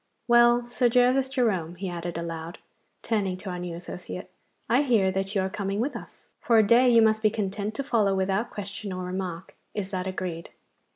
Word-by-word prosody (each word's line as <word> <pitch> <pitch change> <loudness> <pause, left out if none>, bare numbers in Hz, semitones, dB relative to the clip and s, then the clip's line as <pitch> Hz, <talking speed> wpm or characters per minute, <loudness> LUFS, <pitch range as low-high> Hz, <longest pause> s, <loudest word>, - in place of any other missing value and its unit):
Well, 240 0 +5
Sir 245 0 +2
Gervas 250 +2 +3
Jerome,' 200 - 0
he 190 +2 -5
added 175 -1 -4
aloud, 165 +2 -5 0.5
turning 200 -5 -1
to 190 0 -6
our 180 - -5
new 175 -1 -5
associate, 180 +1 -8 0.4
'I 245 +5 +4
hear 225 -9 +3
that 195 +2 -3
you 195 - +3
are 190 - 0
coming 195 +1 -3
with 260 +6 -1
us. - - -10
For 230 - +3
a 220 - +6
day 240 +4 +5
you 230 -2 +6
must 220 0 +3
be 215 - +4
content 210 0 -3
to 275 - -2
follow 215 -7 +2
without 195 +4 0
question 200 0 -6
or 185 0 -4
remark. 180 -1 -5 0.2
Is 195 -2 -3
that 185 -1 -3
agreed! 180 -3 -4
195 Hz, 195 wpm, -26 LUFS, 185-235 Hz, 0.5 s, a